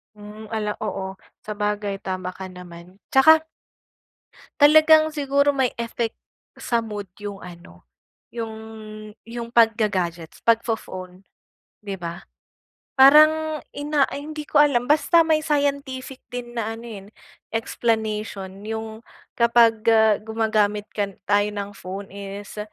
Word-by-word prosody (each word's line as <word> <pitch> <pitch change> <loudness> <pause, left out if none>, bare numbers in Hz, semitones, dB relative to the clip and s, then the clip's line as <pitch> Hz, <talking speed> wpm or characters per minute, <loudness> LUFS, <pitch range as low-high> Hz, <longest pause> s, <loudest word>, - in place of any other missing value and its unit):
Hmm, 210 +1 -11
ala 210 -2 -2
oo. 190 -3 -4 0.3
Sabagay, 210 -1 -2
tama 185 -1 -4
ka 190 -1 -8
naman. 180 0 -12 0.2
Tsaka 315 +4 +6 1.1
talagang 310 +1 +7
siguro 285 -1 +1
may 260 -2 +1
effect, 230 0 -2 0.5
sa 235 -2 0
mood 205 -3 -6
yung 205 -1 -7
ano, 170 - -13 0.5
yung 230 -2 -5 0.7
yung 235 0 -6
pagga-gadgets, 205 -8 +1
pagfo-phone, 195 -5 -1 0.6
'di 195 -2 -5
ba? 170 0 -6 0.8
Parang 310 +3 +6 0.2
ina 290 0 +1
ay, 285 - -5
hindi 305 -1 -5
ko 295 - +2
alam. 265 -5 +3
Basta 330 +2 +4
may 315 -1 +3
scientific 280 -3 -2
din 245 -1 -7
na 230 -2 -2
ano, 230 - -11
eh, 205 -4 -9 0.4
explanation 215 -4 -2
yung 220 0 -5 0.3
kapag 235 -1 +4 0.5
gumagamit 215 -2 0
ka 205 -1 -1 0.2
tayo 205 0 +2
ng 205 -1 -5
phone 195 +1 -8
is 200 +1 -8
220 Hz, 115 wpm, -23 LUFS, 200-265 Hz, 1.1 s, talagang